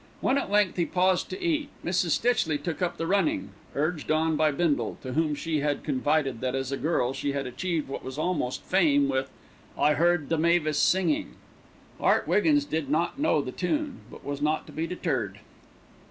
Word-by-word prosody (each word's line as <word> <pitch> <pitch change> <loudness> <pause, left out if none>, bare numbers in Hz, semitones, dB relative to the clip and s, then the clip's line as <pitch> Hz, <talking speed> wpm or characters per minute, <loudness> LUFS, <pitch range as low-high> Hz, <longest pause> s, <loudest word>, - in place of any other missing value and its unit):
When 270 +2 +2
at - - -4
length 205 -3 +2
he 170 - +1
paused 185 0 +1
to 380 - -5
eat, 315 -5 0 0.2
Mrs. 175 0 +1
Stitchley 220 -11 +1
took 165 +4 -5
up 175 -1 -1
the 165 - -2
running, 200 - +1 0.3
urged 155 +2 -1
on 160 +1 +2
by 155 0 +3
Bindle, 150 0 0
to 130 -1 -5
whom 155 0 +1
she 155 +1 -1
had 145 0 -1
confided 140 -3 0
that, 130 0 -1
as 135 0 -2
a 135 - -1
girl, 135 -5 0
she 140 +1 -2
had 140 -1 -2
achieved 155 +5 -2
what 135 - -6
was 130 +1 -7
almost 155 -6 -1
fame 150 -7 +3
with, 135 0 -1 0.5
"I 150 - +4
Heard 170 -1 +2
the 165 -1 +1
Mavis 160 -2 +2
Singing." 175 -5 +1 0.6
Art - - +2
Wiggins 285 - +3
did 160 - -2
not 165 - 0
know 155 - +2
the 130 - -5
tune; 285 - -2
but - - -13
was 140 0 -4
not 155 +1 0
to - - -12
be 165 +1 -3
deterred. 130 - -2
160 Hz, 195 wpm, -27 LUFS, 140-180 Hz, 0.6 s, I